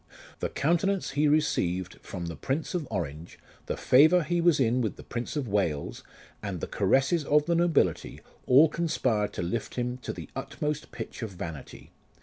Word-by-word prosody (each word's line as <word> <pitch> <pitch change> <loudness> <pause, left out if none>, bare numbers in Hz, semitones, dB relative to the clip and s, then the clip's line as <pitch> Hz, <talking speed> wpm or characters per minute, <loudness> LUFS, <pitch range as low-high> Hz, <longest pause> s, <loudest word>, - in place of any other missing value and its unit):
The - - -2
countenance 175 +5 0
he 145 +2 +2
received 95 - 0
from 85 - -6
the 85 -1 -5
Prince 140 +7 -3
of 170 -6 -2
Orange, 85 -4 -5 0.3
the - - -2
favour 160 +7 +5
he 175 +2 0
was 170 -4 +4
in 125 0 +2
with 110 - -1
the - - -12
Prince 120 +4 -5
of 145 -4 -2
Wales, 95 -8 -1 0.4
and 100 -4 -4
the - - -3
caresses 135 - +2
of 150 +1 +3
the 170 - +1
nobility, 165 - +1 0.3
all 140 +6 +7
conspired 130 -10 0
to - - -3
lift 105 +6 -3
him 125 0 -2
to 130 - -6
the - - -8
utmost 150 0 -4
pitch - - -7
of 115 - -3
vanity. 85 -6 -8
130 Hz, 175 wpm, -28 LUFS, 100-155 Hz, 0.4 s, all